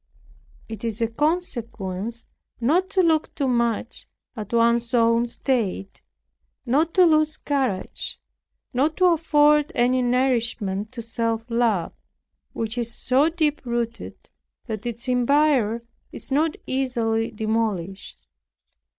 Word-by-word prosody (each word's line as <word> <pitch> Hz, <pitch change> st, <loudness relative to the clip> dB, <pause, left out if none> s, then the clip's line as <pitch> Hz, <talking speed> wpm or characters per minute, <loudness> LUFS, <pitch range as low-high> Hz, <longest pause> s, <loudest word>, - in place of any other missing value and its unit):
It 220 Hz, -1 st, -8 dB
is 225 Hz, -1 st, -2 dB
of 230 Hz, 0 st, -3 dB
consequence 235 Hz, -, -2 dB, 0.3 s
not 335 Hz, +11 st, +2 dB
to 390 Hz, -1 st, +2 dB
look 320 Hz, -2 st, +1 dB
too 275 Hz, -, 0 dB
much 235 Hz, -3 st, -1 dB, 0.3 s
at 210 Hz, -4 st, -7 dB
one's 235 Hz, +1 st, +2 dB
own 230 Hz, 0 st, +3 dB
state, 225 Hz, -6 st, -2 dB, 0.6 s
not 300 Hz, +7 st, +1 dB
to 370 Hz, -2 st, +7 dB
lose 310 Hz, -2 st, +3 dB
courage, 260 Hz, -10 st, -2 dB, 0.5 s
not 290 Hz, +5 st, +1 dB
to 370 Hz, -, +4 dB
afford 300 Hz, -3 st, +4 dB
any 250 Hz, +1 st, +3 dB
nourishment 235 Hz, -5 st, 0 dB
to 235 Hz, -2 st, -6 dB
self 230 Hz, 0 st, -2 dB
love, 230 Hz, -7 st, +1 dB, 0.6 s
which 225 Hz, +1 st, -3 dB
is 235 Hz, -1 st, -3 dB
so 265 Hz, +6 st, +2 dB
deep 310 Hz, -3 st, 0 dB
rooted, 235 Hz, -2 st, -4 dB, 0.3 s
that 220 Hz, 0 st, -5 dB
its 235 Hz, +2 st, -3 dB
empire 250 Hz, -3 st, +2 dB, 0.3 s
is -, -, -7 dB
not 305 Hz, +3 st, +1 dB
easily 235 Hz, -4 st, 0 dB
demolished. 215 Hz, -4 st, -3 dB
240 Hz, 115 wpm, -23 LUFS, 225-290 Hz, 0.6 s, to